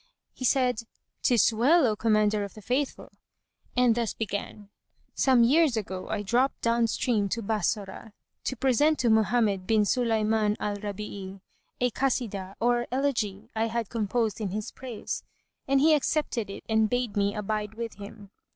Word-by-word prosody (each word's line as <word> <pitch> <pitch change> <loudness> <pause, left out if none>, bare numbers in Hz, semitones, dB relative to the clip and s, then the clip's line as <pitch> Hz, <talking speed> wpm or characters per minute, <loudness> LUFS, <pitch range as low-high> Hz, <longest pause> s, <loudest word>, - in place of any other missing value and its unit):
He 255 - -5
said, 250 -2 +2 0.4
"'Tis 235 -2 +4
well, 275 +8 +4
O 220 -3 +1
Commander 215 -1 +2
of 200 - -8
the 215 - -11
Faithful;" 265 +5 -2 0.7
and 250 -2 +5
thus 230 -1 -2
began: 205 -1 -5 0.4
Some 255 -3 +4
years 280 0 +4
ago, 185 -3 -5
I 210 -1 -2
dropped 245 +6 +1
down 230 0 +2
stream 220 -3 0
to 230 +3 -2
Bassorah, 210 0 -2 0.3
to 260 - -1
present 270 +5 +2
to 235 -2 +2
Mohammed 215 -3 +2
bin 220 -1 +4
Sulayman 220 -2 +1
al 205 -1 -2
Rabí'í[FN#152] 200 -2 -6 0.4
a 250 0 +2
Kasidah 210 -7 -2
or 240 0 +1
elegy 235 -6 -1
I 220 +1 +1
had 230 -2 -3
composed 225 -1 -1
in 205 - -1
his 210 +3 -4
praise; 250 -4 -6 0.5
and 275 0 +3
he 310 +3 +5
accepted 280 -7 0
it 195 - -8
and 220 -1 +2
bade 245 -2 -1
me 205 0 +1
abide 210 0 -3
with 230 0 -5
him. 200 0 -11
220 Hz, 160 wpm, -27 LUFS, 205-245 Hz, 0.7 s, and